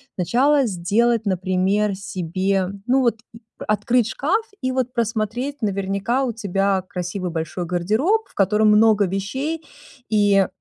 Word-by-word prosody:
сначала 265 - +2
сделать, 220 +4 +1
например, 190 +2 +1
себе, 190 0 -1 0.2
ну, 255 +2 +3
вот, 235 -4 +1
м, 230 - -12 0.3
открыть 230 +2 +2
шкаф 325 - 0 0.2
и 255 0 -1
вот 255 -1 -1
просмотреть. 235 +4 -2
Наверняка 200 +5 -1
у 240 - -2
тебя 195 -3 0
красивый 180 0 -4
большой 165 +2 -4
гардероб, 220 - +1
в - - -24
котором 210 +2 +2
много 210 -1 +5
вещей, 260 - -3 0.5
и 205 -3 +3
210 Hz, 130 wpm, -21 LUFS, 190-245 Hz, 0.5 s, много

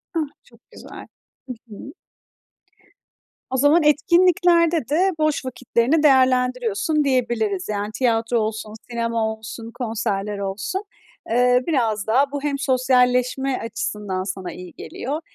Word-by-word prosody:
Ah! 320 -2 +1 0.2
Çok - - -22
güzel. - - -11 0.4
Hı 250 - -4
hı. 220 +6 -10 1.6
O 260 - 0
zaman 290 +5 +4
etkinliklerde 340 - +3
de 360 +6 +2
boş 310 -3 0
vakitlerini 255 +4 0
değerlendiriyorsun 255 0 +2
diyebiliriz. 235 -8 0
Yani, 205 0 -2
tiyatro 235 -1 +1
olsun, 215 0 -3 0.2
sinema 230 -1 -1
olsun, 225 +1 -9
konserler 210 -4 -3
olsun. 200 - -3 0.5
Eee, 250 +1 +3
biraz 225 -10 0
daha 270 +5 +2
bu 285 -1 -4
hem 290 -1 -1
sosyalleşme 255 0 +2
açısından 210 -4 -3
sana 190 -2 -5
iyi 180 -1 -10
geliyor 290 +5 -5
250 Hz, 115 wpm, -22 LUFS, 220-285 Hz, 1.6 s, zaman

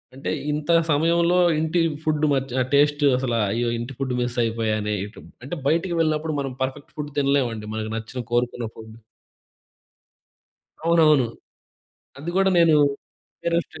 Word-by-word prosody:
అంటే, 135 - -4 0.2
ఇంత 150 +3 -1 0.2
సమయంలో 170 +4 +3 0.2
ఇంటి 160 +2 0 0.2
ఫుడ్ 155 -1 +1
మచ్ 135 -1 -1 0.2
టేస్ట్ 145 +1 +3
అసలు 125 -2 -1 0.2
అయ్యో! 120 +2 0
ఇంటి 120 +3 -5
ఫుడ్ 135 -2 -2
మిస్ 120 0 -2
అయిపోయానే 110 -2 -1
ఇటు. 105 +2 -12 0.2
అంటే 140 +7 -5
బయటకి 170 +4 +1
వెళ్ళినప్పుడు 155 -1 0
మనం 135 -2 -4
పర్ఫెక్ట్ 130 +2 -4
ఫుడ్ 150 -1 -5
తినలేమండి. 135 -6 +1
మనకు 110 0 -4
నచ్చిన 115 +3 -5
కోరుకున్న 120 -1 0
ఫుడ్ 110 0 -11 1.9
అవునవును. 155 -6 +4 0.9
అది 155 +5 -5
కూడా 195 0 +4
నేను 165 -2 +5 0.7
కరస్టే 170 -2 -1
140 Hz, 130 wpm, -23 LUFS, 120-155 Hz, 1.9 s, నేను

